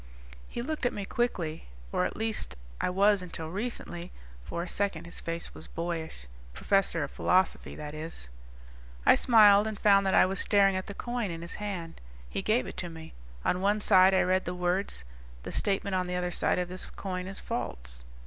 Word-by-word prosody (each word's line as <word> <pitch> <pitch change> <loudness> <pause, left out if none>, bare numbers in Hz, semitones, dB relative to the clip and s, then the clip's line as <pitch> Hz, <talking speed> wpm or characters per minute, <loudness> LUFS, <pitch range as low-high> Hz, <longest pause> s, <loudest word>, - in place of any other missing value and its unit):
He 235 - -4
looked 300 -2 -1
at - - -2
me 200 - -4
quickly. 175 -10 -2 0.2
"Or 90 - +1
at - - -3
least 220 - -1 0.3
I - - +1
was 200 +2 +4
until 165 -3 -6
recently." 190 -4 -4 0.3
For 170 - -4
a - - -6
second 180 -4 -2
his 175 - -2
face 165 0 -4
was - - -11
boyish. 165 - -4 0.3
"Professor 195 -5 +1
of 140 - -5
Philosophy, 185 +1 +1
that 150 -1 -7
is." 155 - -7 0.8
I - - +8
smiled 210 -3 +6
and 215 -1 -4
found 200 -1 +5
that 190 - +3
I - - +7
was 190 +1 -1
staring 200 -2 +4
at 185 - -3
the 200 - -7
coin 240 -3 -2
in 165 0 -5
his 170 - -6
hand. 180 -5 -5 0.3
He - - -3
gave 215 +5 +2
it - - -8
to 175 - -3
me. 160 -1 -10 0.3
On 180 - +1
one 205 +2 +2
side 190 -2 +6
I - - +5
read 185 +1 +2
the 180 - -3
words: 180 - -1 0.4
THE - - -6
STATEMENT 200 -1 -1
ON 185 -1 0
THE 180 - -2
OTHER 180 0 -1
SIDE - - +2
OF 180 -1 -1
THIS 185 +1 -5
COIN 185 -2 -5
IS 195 +1 -6
FALSE. - - -5
185 Hz, 200 wpm, -29 LUFS, 170-200 Hz, 0.8 s, I